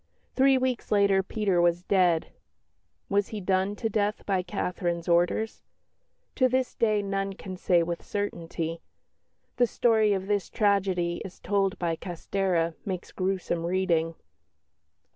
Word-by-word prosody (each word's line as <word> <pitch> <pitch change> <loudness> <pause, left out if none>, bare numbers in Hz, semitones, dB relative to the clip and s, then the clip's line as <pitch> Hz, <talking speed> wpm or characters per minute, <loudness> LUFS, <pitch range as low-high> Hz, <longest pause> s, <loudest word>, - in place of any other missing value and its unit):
Three 270 0 +5
weeks 255 -2 -2
later 200 -2 +4
Peter 195 -2 0
was 175 0 +2
dead; 180 -4 +2 0.8
was 200 0 +1
he 215 - -5
done 190 +1 0
to 225 - -2
death 210 -1 -1
by 190 -2 +1
Catherine's 175 -2 -3
orders? 175 +6 +1 0.8
To 255 -2 +4
this 260 0 0
day 215 -2 +1
none 195 0 -2
can 190 -1 -8
say 175 -1 +2
with 170 0 -4
certainty. 170 -4 -4 0.8
The 245 0 +4
story 220 -2 +3
of 190 -1 -2
this 205 -1 -1
tragedy 190 -4 +1
as 190 - -10
told 195 -2 0
by 170 -2 -1
Castèra 175 -1 -1
makes 185 -3 -5
gruesome 185 -3 -2
reading. 170 -2 +1
190 Hz, 135 wpm, -27 LUFS, 175-205 Hz, 0.8 s, Three